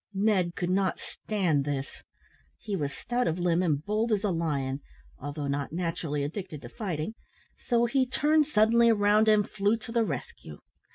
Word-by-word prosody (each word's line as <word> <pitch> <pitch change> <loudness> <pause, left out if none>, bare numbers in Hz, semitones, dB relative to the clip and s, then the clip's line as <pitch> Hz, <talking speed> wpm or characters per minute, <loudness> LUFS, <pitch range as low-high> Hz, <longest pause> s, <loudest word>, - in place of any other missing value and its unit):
Ned 195 -4 +2
could 180 0 -1
not 190 0 +1
stand 180 -10 -1
this. 140 -1 -4 0.6
He 210 -3 -4
was 145 -6 -2
stout 245 +10 -2
of 165 +1 0
limb 175 -1 +2
and 155 -4 0
bold 215 +2 0
as 210 -1 +1
a 205 - +1
lion, 145 -5 -1 0.4
although 145 0 -5
not 140 0 -2
naturally 165 -3 -2
addicted 155 0 -5
to - - -8
fighting, 180 -2 -4 0.5
so 240 -1 +2
he 255 +2 +1
turned 300 +3 +2
suddenly 235 -2 +4
round 210 0 +4
and 210 -1 +4
flew 205 +2 +1
to 230 - -9
the 230 -1 +2
rescue. 130 - -6
190 Hz, 170 wpm, -28 LUFS, 155-220 Hz, 0.6 s, suddenly